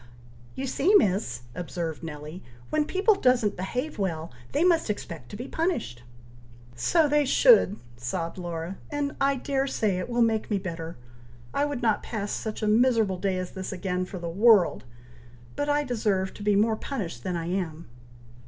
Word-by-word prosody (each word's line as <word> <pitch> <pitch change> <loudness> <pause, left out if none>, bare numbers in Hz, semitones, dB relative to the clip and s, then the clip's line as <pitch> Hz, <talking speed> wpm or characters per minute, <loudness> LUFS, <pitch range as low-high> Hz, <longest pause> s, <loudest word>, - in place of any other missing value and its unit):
"You 270 - -3
see, 310 +9 +2
Miss!" 180 - +2
observed 170 -2 -4
Nelly, 155 +2 -7 0.3
"when 305 -1 +2
people 385 +6 +3
doesn't 250 - +2
behave 245 - -4
well, 165 -4 -2 0.2
they 295 - +2
must 335 -7 +3
expect 165 - -5
to - - -8
be 245 +5 -6
punished." 310 - -2 0.7
"So 315 - +3
they 295 0 +3
should!" 285 - +5 0.2
sobbed 165 +9 -4
Laura; 175 +1 -5
"and 290 -1 -2
I 280 - +1
dare 270 +1 -1
say 205 -8 0
it 185 - -4
will 240 0 +3
make 225 -1 0
me 210 - +1
better! 165 -5 -5 0.6
I 285 - +2
would 285 -4 -4
not 220 -3 +2
pass 205 -3 -4
such 220 0 -4
a - - +1
miserable 220 -4 +3
day 190 -1 0
as 185 -1 -4
this 190 -1 -5
again, 185 -1 -2
for 185 - -7
the 170 -1 -5
world; 180 - +4 0.7
but 290 - -1
I 290 0 +2
deserve 210 -7 0
to - - -12
be 205 0 +2
more 220 +2 +3
punished 200 - -5
than 180 - -2
I 165 - -3
am." 170 -3 -3
205 Hz, 175 wpm, -27 LUFS, 175-260 Hz, 0.7 s, should